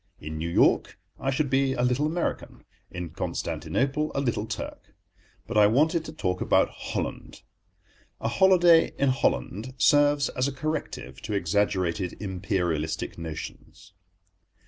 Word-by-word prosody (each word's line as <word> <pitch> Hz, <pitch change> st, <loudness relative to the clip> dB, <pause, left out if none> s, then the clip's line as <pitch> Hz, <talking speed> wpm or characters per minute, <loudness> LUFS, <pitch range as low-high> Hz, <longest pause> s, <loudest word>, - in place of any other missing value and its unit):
In 80 Hz, +1 st, -6 dB
New 85 Hz, +1 st, -2 dB
York -, -, +3 dB, 0.2 s
I 135 Hz, -, -1 dB
should 135 Hz, +2 st, +1 dB
be 135 Hz, 0 st, +2 dB
a 125 Hz, -, -1 dB
Little 125 Hz, +4 st, +2 dB
American; 170 Hz, +2 st, -3 dB, 0.3 s
in 90 Hz, -3 st, -6 dB
Constantinople 140 Hz, -, -2 dB
a -, -, +1 dB
Little 120 Hz, -5 st, -1 dB
Turk. 115 Hz, 0 st, -7 dB, 0.5 s
But 110 Hz, -2 st, +1 dB
I 105 Hz, -, +7 dB
wanted 155 Hz, -, +2 dB
to 155 Hz, -, -6 dB
talk 90 Hz, -12 st, -2 dB
about -, -, +3 dB
Holland. -, -, -5 dB, 0.8 s
A -, -, -2 dB
holiday 175 Hz, +2 st, +5 dB
in 140 Hz, -, +2 dB
Holland 120 Hz, -, -1 dB
serves 145 Hz, 0 st, +4 dB
as 125 Hz, +1 st, -1 dB
a -, -, -2 dB
corrective 135 Hz, -, -4 dB
to 110 Hz, -, -4 dB
exaggerated 95 Hz, -1 st, 0 dB
Imperialistic 90 Hz, -6 st, -2 dB
notions. 85 Hz, +3 st, -8 dB
120 Hz, 135 wpm, -26 LUFS, 90-145 Hz, 0.8 s, I